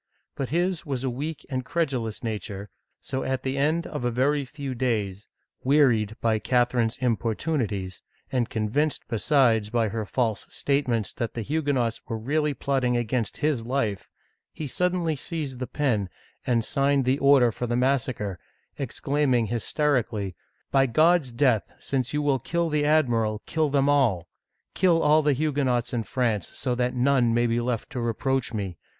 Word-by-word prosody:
But 135 - -4
his 175 +1 0
was 135 -5 -3
a 130 - 0
weak 145 +5 -5
and 130 -1 -3
credulous 130 -8 -2
nature, 105 -3 -5 0.3
so 130 - -3
at 130 -1 -2
the 130 0 -1
end 155 +5 +1
of 150 -5 -5
a 120 - +2
very 140 +4 +1
few 140 0 -6
days, 105 -6 -2 0.4
wearied 125 -7 +3
by 110 -2 +2
Catherine's 120 -1 +1
importunities, 115 - -1 0.3
and 125 -3 0
convinced 115 +8 -1
besides 115 -3 +2
by 115 -1 +1
her 110 0 -3
false 115 -4 -1
statements 125 -7 0
that 115 -3 -4
the 115 - -3
Huguenots 135 -5 0
were 115 -1 -3
really 145 +5 0
plotting 130 -3 0
against 120 -1 -1
his 145 -7 +1
life, 115 -5 -2 0.4
he 155 - -6
suddenly 175 +2 0
seized 145 -3 -5
the 130 - -3
pen, 115 -10 0 0.4
and 115 -3 +2
signed 140 -1 +2
the 130 +2 +2
order 135 -4 +5
for 120 +3 -4
the 120 - 0
massacre, 125 -8 0 0.4
exclaiming 135 -3 0
hysteri 130 +3 +1
cally: 100 -4 -4 0.2
" - - -45
By 135 -1 +4
God's 155 +2 +3
death, 120 -3 +2
since 130 -2 -2
you 150 0 -1
will 140 -2 +2
kill 170 +6 -1
the 150 -1 +1
admiral, 120 -8 +2
kill 155 -2 0
them 140 0 +2
all! 120 -12 +2 0.5
Kill 175 -3 +3
all 155 +1 +5
the 145 -1 +3
Huguenots 135 -4 0
in 120 - 0
France, 115 -4 -1
so 125 - -3
that 125 +1 0
none 125 -2 +3
may 120 0 +3
be 120 0 +1
left 120 -1 -2
to 125 - -3
reproach 130 +3 -1
me. 100 -6 -4
125 Hz, 165 wpm, -26 LUFS, 115-145 Hz, 0.5 s, order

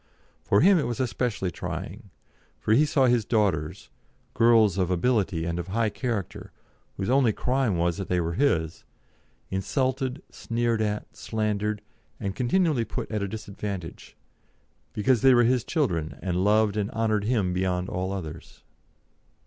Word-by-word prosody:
For 100 - +3
him 190 +2 +6
it 145 - -1
was 120 -2 -4
especially 120 -6 -1
trying, - - -6 0.5
for 110 - +1
he 145 +7 +5
saw 135 -2 +3
his 120 -2 +3
daughters 95 -10 -1 0.4
girls 110 -4 +4
of 90 -2 +1
ability 95 -3 +1
and 85 0 -2
of 85 - -5
high 110 +2 0
character, 115 -8 -4 0.5
whose 95 - -2
only 130 -4 +4
crime 125 -3 0
was 85 +1 0
that 95 - -4
they 90 - +1
were 85 0 -1
his 85 - 0 0.7
insulted, 130 +7 -1
sneered 115 -1 -1
at, 105 -1 -3
slandered, 105 -1 -2 0.5
continually 140 - +1
put 110 - -5
at 105 -1 -1
a 100 - -1
disadvantage, 100 -4 -7 0.7
because 120 +2 +1
they 130 -1 +6
were 120 - +5
his 125 0 +2
children 85 - -1
and 90 0 -1
loved 105 0 +3
and 105 -1 -1
honoured 110 -2 0
him 105 -6 +1
beyond 90 0 -1
all 95 0 -3
others. 80 -4 -7
105 Hz, 150 wpm, -26 LUFS, 95-120 Hz, 0.7 s, him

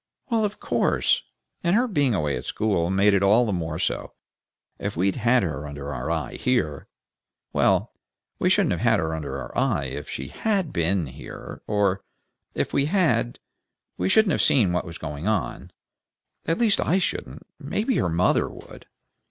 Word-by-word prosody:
"Well, 225 -1 +2
of 210 0 -2
course! - - +1 0.4
And 175 +2 +3
her 245 +3 +3
being 145 - +2
away 75 -6 0
at 60 - -6
school 95 -6 0
made 100 +2 +4
it 100 - +3
all 105 +5 +5
the 105 - -1
more 80 -3 -2
so. - - -2 0.7
If - - -4
we'd 95 +5 +1
had 120 0 +3
her 75 -4 -3
under 70 0 -6
our 80 - -4
eye, 80 -5 -2
here 100 - 0 0.7
Well, - - +2 0.5
we - - +2
shouldn't - - +3
have - - -1
had - - +3
her 80 0 -1
under 70 -4 -4
our 65 - -8
eye - - +1
if - - -6
she 70 +2 -5
had 195 -8 -1
BEEN 85 0 +1
here; 65 - -9
or 100 -2 +1 0.5
if - - -1
we 140 - +3
had, 155 - +1 0.6
we 90 +1 -1
shouldn't 215 - +4
have - - +2
seen 105 -10 +4
what 90 - 0
was 85 -1 -8
going 75 +3 -5
on; 110 -5 -1 0.8
at 165 - +1
least 225 -4 +3
I 175 - +2
shouldn't; 190 - -3
maybe 225 +4 -1
her 85 - +1
mother 85 +3 +2
would. - - -13
95 Hz, 175 wpm, -25 LUFS, -, 0.8 s, all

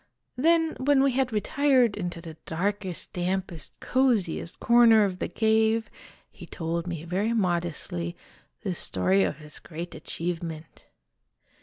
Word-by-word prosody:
Then, 325 +4 +3
when 270 +1 +4
we 275 - +3
had 255 0 0
retired 250 +1 +2
into 175 -4 -4
the 165 -2 -9
darkest, 190 +1 -3
dampest, 180 -4 -3
coziest 225 -11 0
corner 235 -2 +6
of 185 -2 -2
the - - -1
cave, 220 0 +2 0.4
he 175 - -12
told 170 +1 -3
me 170 -3 -4
very 190 +7 -1
modestly 175 -3 -2 0.5
the 190 -4 -1
story 190 +3 +2
of - - -1
his 150 -1 -10
great 170 +1 -7
achievement. 165 0 -5
190 Hz, 130 wpm, -27 LUFS, 170-230 Hz, 0.5 s, corner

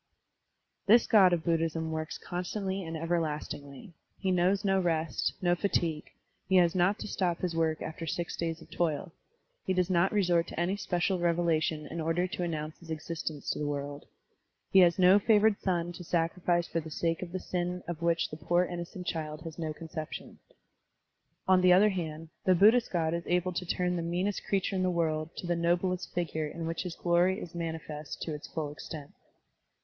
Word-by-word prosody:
This 230 +3 +7
God 195 -5 +6
of 170 -2 +1
Buddhism 165 -1 0
works 155 0 -3
constantly 190 +2 -3
and 165 -1 -5
everlastingly; 155 0 -3 0.2
he 190 - 0
knows 185 +3 +2
no 195 -1 +3
rest, 165 -3 0
no 175 -1 +4
fatigue, 170 -4 0 0.4
he 190 - +3
has 175 -2 +5
not 185 +3 +2
to - - -6
stop 180 -4 -1
his 175 -2 -1
work 160 -1 0
after 165 +1 -6
six 170 +2 -2
days 165 -1 -3
of - - -20
toil; 170 0 -1 0.5
he 190 - 0
does 180 0 +1
not 180 +2 +3
resort 175 -5 +2
to - - -6
any 175 +3 +1
special 185 -1 0
revelation 165 -3 +1
in 165 0 -5
order 165 +3 +1
to 185 +1 -6
annotmce 155 -3 -3
his 170 - -15
existence 160 -1 -4
to - - -3
the 150 - -1
world; 145 0 -4 0.6
he 195 - +7
has 175 -2 +6
no 185 +2 +7
favored 215 0 +4
son 175 -2 0
to 175 +1 -9
sacrifice 170 +1 +1
for 165 - -1
the 160 0 -7
sake 165 +1 -1
of 180 -2 -6
the 185 - -3
sin 180 0 -3
of 170 -1 -5
which 170 0 +1
the 155 - -6
poor 175 +3 +2
innocent 175 +1 -6
child 155 -2 -3
has 165 0 -8
no 160 -2 -2
conception. 155 0 -7 1.1
On 185 -1 +5
the 180 0 +6
other 200 +4 +6
hand, 165 -4 -4 0.2
the 185 - +5
Buddhist 220 +6 +5
God 165 -2 +1
is 170 - -1
able 180 +1 +1
to 180 - -3
ttim 180 0 0
the - - -1
meanest 180 +4 -1
creature 195 -1 +1
in 185 - 0
the 185 - +2
world 160 -2 0
to - - -5
the 175 0 +1
noblest 175 +2 0
figure 160 -3 -2
in 165 +2 -6
which 165 0 -2
his 180 -2 -5
glory 175 +3 +2
is 175 - -8
manifest 160 -3 -5
to 160 - -3
its 150 - -7
full 155 -3 -4
extent. 150 -1 -8
170 Hz, 195 wpm, -30 LUFS, 160-180 Hz, 1.1 s, This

